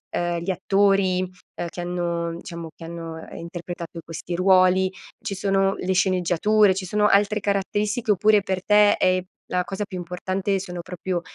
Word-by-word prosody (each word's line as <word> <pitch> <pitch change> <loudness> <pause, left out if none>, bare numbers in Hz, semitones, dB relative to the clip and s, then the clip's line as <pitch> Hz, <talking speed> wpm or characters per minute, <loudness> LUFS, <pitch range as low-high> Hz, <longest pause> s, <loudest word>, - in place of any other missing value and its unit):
uhm, 175 0 0
gli 175 +3 -2
attori, 195 -1 +2
uhm, 180 -1 -7
che 175 - -10
hanno 170 -1 -2
diciamo, 170 -2 -7
che - - -12
hanno 165 -1 -7
interpretato 170 0 -7
questi 165 +1 -6
ruoli? 185 0 +4 0.3
Ci 220 -3 -4
sono 195 0 +1
le 190 +1 -1
sceneggiature, 185 +3 +3
ci 190 0 -3
sono 210 +3 +2
altre 205 +1 +3
caratteristiche 205 +2 0
oppure 210 +1 +4
per 190 -2 -2
te 210 0 +5
è 185 0 +2 0.3
la 180 0 +1
cosa 195 +2 -3
più 195 -3 -7
importante 185 +3 -2
sono 180 -2 -6
proprio, 180 0 -4
185 Hz, 160 wpm, -23 LUFS, 175-200 Hz, 0.3 s, te